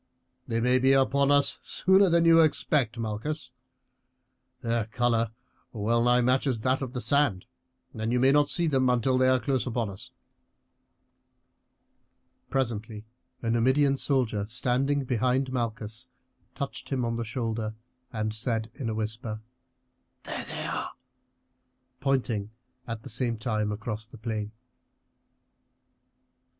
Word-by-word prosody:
"They 115 - 0
may 125 +2 +3
be 135 +1 +4
upon 135 +1 +3
us 145 0 +3
sooner 190 +1 +4
than 170 0 +3
you 165 0 +7
expect, 140 -5 +1
Malchus. 115 +7 -4 1.1
Their 115 -1 0
colour 115 -1 0 0.4
well 115 +2 +1
nigh 120 0 +4
matches 130 +1 +2
with 110 - -11
that 130 +2 +1
of 130 -2 -4
the 125 - -3
sand, 140 -11 +2 0.5
and 110 0 -2
you 125 - +2
may 130 +2 +5
not 145 0 +4
see 175 - 0
them 135 -5 +2
until 125 +1 +2
they 130 - +4
are 130 0 +4
close 130 -1 -1
upon 115 -4 -1
us." 95 - -10 2.4
Presently 110 -4 -2 0.4
a 115 - 0
Numidian 130 +4 +3
soldier 120 -7 0
standing 130 +4 +1
behind 130 +1 0
Malchus 115 -1 -3 0.5
touched 140 - -5
him 130 -3 0
on 115 0 -1
the 115 - -2
shoulder 110 -1 -3 0.4
and 110 -1 -2
said 110 0 -1
in 130 -6 -4
a 110 - -2
whisper: 110 0 -4 0.8
"There - - -4
they - - -4
are!" - - -3 1.1
pointing 120 -7 0 0.4
at 115 -1 -5
the - - -7
same 120 0 0
time 110 -2 -1
across 110 +1 -5
the 120 - -13
plain. 110 -2 -4
120 Hz, 135 wpm, -27 LUFS, 110-135 Hz, 2.4 s, you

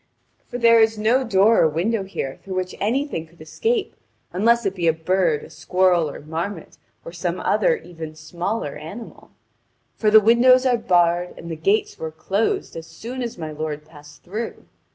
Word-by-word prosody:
For 245 - -5
there 230 -1 +6
is 220 0 +3
no 230 +5 +2
door 220 -1 +4
or 160 - +4
window 195 +8 0
here 135 -8 -5
through 190 -1 -6
which 185 0 -2
anything 235 - -1
could 170 +2 -24
escape, 415 - -2 0.4
unless 230 +5 +3
it 195 - 0
be 175 -3 -1
a 165 - +5
bird, 165 -1 0
a - - -11
squirrel, 175 +1 +2
or - - -8
marmot, 165 +7 -6 0.3
or - - -7
some - - -3
other - - +2
even 160 - -9
smaller 170 +2 -4
animal; 205 +9 -10 0.6
for 215 - +1
the 220 +1 +8
windows 245 +4 +5
are 250 -1 +4
barred, 175 -3 +1
and 170 - -8
the - - -3
gates 195 +7 0
were 160 - -4
closed 200 - -1
as 165 0 -7
soon 235 +10 -7
as 235 -4 -4
my 160 -2 -5
lord 150 0 -5
passed 145 -2 -16
through. 215 +6 -6
185 Hz, 180 wpm, -22 LUFS, 160-230 Hz, 0.6 s, the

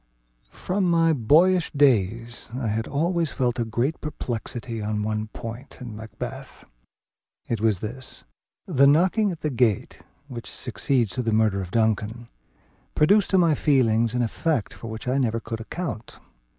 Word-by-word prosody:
From 190 +1 -2
my 165 -1 +4
boyish 165 +8 +4
days 120 -4 +1
I 120 -4 -1
had 110 +2 -1
always 165 +2 0
felt 125 -1 -1
a - - +2
great 120 +7 -1
perplexity 120 -5 -4
on 105 0 -2
one 110 0 -2
point 115 +4 -8
in 120 -4 -7
Macbeth. 120 +5 -8 0.8
It 115 -3 -2
was 110 -5 +2
this: 125 +5 -6 0.4
the 140 -6 +4
knocking 185 +8 +3
at 165 - -8
the 155 - -1
gate, 120 -5 0 0.3
which 120 -4 -8
succeeds 120 -1 -1
to 125 - -2
the 115 -2 -1
murder 110 -3 +2
of 90 - -6
Duncan, 110 +2 0 0.7
produced 200 +6 +4
to 190 - +3
my 170 -3 +4
feelings 115 -6 +2
an 125 - +2
effect 125 +1 -1
for 115 - -9
which 110 +2 -7
I 130 +2 +1
never 115 -3 +1
could 115 0 -6
account. 120 -3 -6
120 Hz, 155 wpm, -24 LUFS, 110-150 Hz, 0.8 s, my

